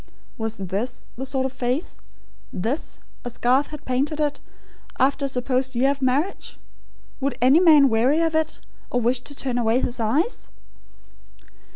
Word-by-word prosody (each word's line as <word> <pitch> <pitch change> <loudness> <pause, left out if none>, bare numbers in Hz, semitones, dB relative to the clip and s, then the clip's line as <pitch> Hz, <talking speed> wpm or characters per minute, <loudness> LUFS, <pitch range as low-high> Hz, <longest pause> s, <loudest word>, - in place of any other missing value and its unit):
Was 220 0 -4
this 195 +6 -3
the 265 +2 -5
sort 265 -1 -1
of 265 - -2
face 255 +6 -2 0.5
this, 230 - -3 0.2
as 245 -1 -6
Garth 260 +4 +3
had 300 -2 -9
painted 275 +4 -1
it, 295 -1 0 0.6
after 275 +2 +2
a - - 0
supposed 255 0 -1
year 265 +3 +3
of 280 -1 -5
marriage? 275 +9 -1 0.6
Would 275 -1 -2
any 260 +6 +6
man 310 -6 +7
weary 250 +6 +3
of 325 -1 +1
it, 315 -1 -1 0.3
or 245 - 0
wish 240 +1 +1
to 285 +3 -11
turn 255 -3 -2
away 230 +1 +2
his 245 -1 -1
eyes? 285 - 0
260 Hz, 160 wpm, -23 LUFS, 245-285 Hz, 0.6 s, man